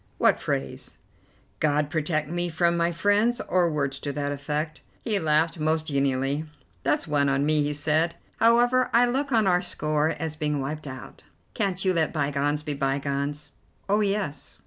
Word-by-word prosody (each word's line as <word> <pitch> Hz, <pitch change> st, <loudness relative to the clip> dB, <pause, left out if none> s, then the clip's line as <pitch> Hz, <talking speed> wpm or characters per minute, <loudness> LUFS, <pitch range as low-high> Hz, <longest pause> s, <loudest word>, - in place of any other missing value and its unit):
"What -, -, +3 dB
phrase?" 65 Hz, 0 st, -4 dB, 0.6 s
"'God 150 Hz, -1 st, +1 dB
protect 155 Hz, -2 st, -1 dB
me 175 Hz, +2 st, -2 dB
from 170 Hz, +1 st, +1 dB
my 170 Hz, 0 st, +1 dB
friends,' 205 Hz, +7 st, +2 dB
or 180 Hz, -1 st, +1 dB
words 140 Hz, -3 st, -2 dB
to 145 Hz, -, -3 dB
that 145 Hz, 0 st, -2 dB
effect." 150 Hz, +2 st, -3 dB, 0.2 s
He 215 Hz, -3 st, +1 dB
laughed 160 Hz, +1 st, +1 dB
most 155 Hz, +1 st, +1 dB
genially. 140 Hz, +1 st, 0 dB, 0.4 s
"That's 165 Hz, -, 0 dB
one 145 Hz, -2 st, +2 dB
on 135 Hz, +1 st, +1 dB
me," 155 Hz, 0 st, +3 dB
he 145 Hz, 0 st, 0 dB
said. 155 Hz, +3 st, +1 dB, 0.2 s
"However, 240 Hz, +2 st, +4 dB
I 240 Hz, +1 st, +6 dB
look 275 Hz, +3 st, -1 dB
on 225 Hz, -3 st, +3 dB
our 180 Hz, -2 st, +3 dB
score 155 Hz, -4 st, 0 dB
as 160 Hz, -1 st, -4 dB
being 150 Hz, -2 st, -1 dB
wiped 150 Hz, +3 st, -4 dB
out. 130 Hz, 0 st, -9 dB, 0.3 s
Can't 195 Hz, -4 st, -1 dB
you 185 Hz, -, +3 dB
let 160 Hz, -3 st, 0 dB
bygones 145 Hz, 0 st, 0 dB
be 150 Hz, -1 st, -3 dB
bygones?" 140 Hz, +1 st, -2 dB, 0.4 s
"Oh, 205 Hz, +2 st, +2 dB
yes." 200 Hz, -8 st, -2 dB
155 Hz, 170 wpm, -26 LUFS, 145-180 Hz, 0.6 s, I